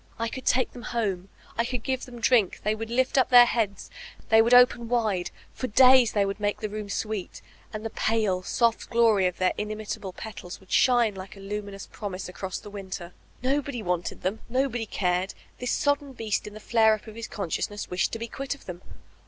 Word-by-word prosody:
I 230 Hz, 0 st, -1 dB
could 260 Hz, +2 st, -7 dB
take 255 Hz, -, +3 dB
them 245 Hz, -, -10 dB, 0.2 s
home, 195 Hz, -4 st, -1 dB, 0.3 s
I -, -, +4 dB
could 245 Hz, -1 st, -3 dB
give 260 Hz, -1 st, -2 dB
them 240 Hz, -2 st, -10 dB
drink, 230 Hz, -5 st, +3 dB
they 210 Hz, -, +2 dB
would 225 Hz, +1 st, -5 dB
lift 260 Hz, +3 st, +2 dB
up 255 Hz, -, +3 dB
their 245 Hz, -1 st, +9 dB
heads, 215 Hz, -5 st, -2 dB, 0.4 s
they 220 Hz, 0 st, +7 dB
would 230 Hz, +2 st, +2 dB
open 245 Hz, -2 st, +5 dB
wide, 215 Hz, -7 st, 0 dB, 0.2 s
for 255 Hz, -, -3 dB
days 255 Hz, +1 st, +6 dB
they 205 Hz, -2 st, +2 dB
would 195 Hz, +1 st, -3 dB
make 205 Hz, 0 st, -1 dB
the 215 Hz, -, -3 dB
room 210 Hz, 0 st, -6 dB
sweet, 210 Hz, -2 st, -4 dB, 0.3 s
and 215 Hz, 0 st, -6 dB
the 225 Hz, -, -3 dB
pale, 215 Hz, -6 st, 0 dB
soft 230 Hz, +4 st, 0 dB
glory 225 Hz, -5 st, +4 dB
of 180 Hz, -, -4 dB
their 185 Hz, 0 st, +2 dB
inimitable 210 Hz, -2 st, -4 dB
petals 185 Hz, -2 st, -8 dB
would 190 Hz, -, -20 dB
shine 240 Hz, -4 st, +4 dB
like 190 Hz, +1 st, -9 dB
a -, -, -11 dB
luminous 200 Hz, 0 st, -6 dB
promise 195 Hz, -3 st, -6 dB
across 185 Hz, 0 st, -5 dB
the 205 Hz, -, -10 dB
winter. 185 Hz, -3 st, -7 dB, 0.3 s
Nobody 270 Hz, -2 st, -1 dB
wanted 175 Hz, -1 st, -2 dB
them, 195 Hz, +4 st, -1 dB
nobody 245 Hz, -2 st, 0 dB
cared; 180 Hz, 0 st, -1 dB, 0.2 s
this 250 Hz, -, -3 dB
sodden 285 Hz, -1 st, 0 dB
beast 220 Hz, -4 st, -2 dB
in 210 Hz, -, -9 dB
the -, -, -8 dB
flare 220 Hz, 0 st, +4 dB
up 215 Hz, -, -13 dB
of 220 Hz, -, -10 dB
his 230 Hz, +1 st, -6 dB
consciousness 205 Hz, +2 st, -4 dB
wished 180 Hz, +1 st, 0 dB
to -, -, -1 dB
be 230 Hz, +1 st, -5 dB
quit 275 Hz, +4 st, -4 dB
of 280 Hz, -, -19 dB
them. 180 Hz, -1 st, -7 dB
215 Hz, 210 wpm, -26 LUFS, 195-240 Hz, 0.4 s, their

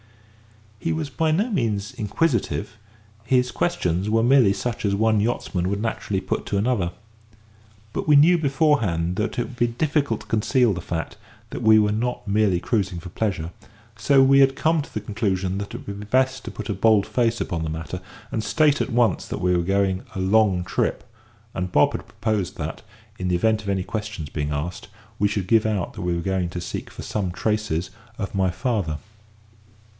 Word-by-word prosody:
He 165 Hz, -, -1 dB
was 155 Hz, -3 st, -3 dB
by 160 Hz, +3 st, 0 dB
no 200 Hz, +10 st, +1 dB
means 110 Hz, -, -1 dB
inquisitive; 110 Hz, -, -1 dB, 0.5 s
his 125 Hz, +1 st, +2 dB
questions 95 Hz, -, 0 dB
were 115 Hz, +1 st, +3 dB
merely 125 Hz, -4 st, +5 dB
such 115 Hz, +3 st, -3 dB
as 100 Hz, -2 st, +1 dB
one 110 Hz, +1 st, +3 dB
yachtsman 95 Hz, -5 st, -1 dB
would 100 Hz, +1 st, -1 dB
naturally 105 Hz, -3 st, -2 dB
put -, -, -3 dB
to 100 Hz, -, 0 dB
another. 100 Hz, -5 st, +1 dB, 1.0 s
But -, -, -3 dB
we 150 Hz, -, +6 dB
knew 165 Hz, +5 st, +6 dB
beforehand 135 Hz, -, +1 dB
that 110 Hz, +4 st, -2 dB
it 120 Hz, -, +1 dB
would 125 Hz, -, -9 dB
be 120 Hz, -, +3 dB
difficult 140 Hz, -1 st, 0 dB
to -, -, -12 dB
conceal 115 Hz, +1 st, +2 dB
the 90 Hz, -, -5 dB
fact 80 Hz, -2 st, -4 dB, 0.3 s
that -, -, -5 dB
we 110 Hz, 0 st, +6 dB
were 105 Hz, -1 st, +3 dB
not 120 Hz, +2 st, -2 dB
merely 100 Hz, -3 st, +2 dB
cruising 95 Hz, -4 st, -1 dB
for 90 Hz, -, -9 dB
pleasure; 85 Hz, -4 st, -2 dB, 0.4 s
so 135 Hz, +3 st, +4 dB
we 135 Hz, +1 st, +6 dB
had 135 Hz, -1 st, +5 dB
come 160 Hz, +2 st, +2 dB
to -, -, -10 dB
the 105 Hz, -, -4 dB
conclusion 100 Hz, -3 st, -1 dB
that 100 Hz, -, -6 dB
it -, -, -8 dB
would 100 Hz, 0 st, -6 dB
be 105 Hz, -, -7 dB
best 130 Hz, +3 st, +1 dB
to -, -, -4 dB
put 105 Hz, +1 st, -7 dB
a -, -, -1 dB
bold 105 Hz, +1 st, +4 dB
face 120 Hz, -1 st, 0 dB
upon 85 Hz, -2 st, -2 dB
the 80 Hz, -, -2 dB
matter, 80 Hz, -2 st, -5 dB, 0.3 s
and 110 Hz, -, -2 dB
state 150 Hz, +2 st, +3 dB
at -, -, -1 dB
once 115 Hz, -6 st, +2 dB
that -, -, -4 dB
we 90 Hz, 0 st, +2 dB
were 85 Hz, -, +2 dB
going 95 Hz, +1 st, +1 dB
a -, -, -3 dB
long 95 Hz, -1 st, +3 dB
trip; -, -, -1 dB, 0.5 s
and 90 Hz, 0 st, -3 dB
Bob 75 Hz, -, +4 dB
had -, -, -6 dB
proposed 100 Hz, -4 st, -2 dB
that, 80 Hz, +1 st, -5 dB, 0.4 s
in 90 Hz, -, -2 dB
the 90 Hz, -, +2 dB
event 110 Hz, +4 st, +2 dB
of 100 Hz, -, -6 dB
any 95 Hz, -2 st, 0 dB
questions 105 Hz, -8 st, -5 dB
being 75 Hz, -1 st, -3 dB
asked, 75 Hz, +5 st, -4 dB, 0.3 s
we 105 Hz, -, +4 dB
should 100 Hz, -2 st, -2 dB
give 110 Hz, +1 st, +3 dB
out 105 Hz, -5 st, -1 dB
that -, -, -7 dB
we 90 Hz, -1 st, 0 dB
were 85 Hz, -, -2 dB
going 95 Hz, -2 st, 0 dB
to 90 Hz, -, -5 dB
seek 85 Hz, -, -5 dB
for -, -, -9 dB
some 100 Hz, -4 st, -2 dB
traces 95 Hz, -3 st, -1 dB, 0.3 s
of 100 Hz, -3 st, -4 dB
my 95 Hz, -1 st, +2 dB
father. 95 Hz, -, -1 dB
105 Hz, 200 wpm, -23 LUFS, 95-120 Hz, 1.0 s, we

